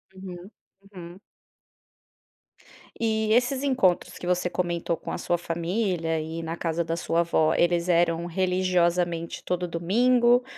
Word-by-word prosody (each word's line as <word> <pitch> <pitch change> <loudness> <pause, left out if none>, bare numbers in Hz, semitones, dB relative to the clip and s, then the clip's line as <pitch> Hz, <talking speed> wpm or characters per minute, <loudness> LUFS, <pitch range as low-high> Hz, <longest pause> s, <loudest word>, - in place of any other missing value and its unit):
Uhum, 185 0 -9 0.4
uhum. 175 0 -10 1.8
E 220 -1 0
esses 250 +3 +2
encontros 250 -11 +1
que - - -8
você 180 0 +1
comentou 175 -1 -1
com - - -7
a - - -3
sua 175 - 0
família 170 -1 -1
e 160 +1 -5
na 165 0 -4
casa 170 0 -1
da 165 0 -2
sua 170 0 0
avó, 160 -2 +2
eles 175 0 +1
eram 170 -1 +2
religiosamente 175 -2 0
todo 180 0 -2
domingo 240 +8 +3
175 Hz, 130 wpm, -26 LUFS, 170-190 Hz, 1.8 s, domingo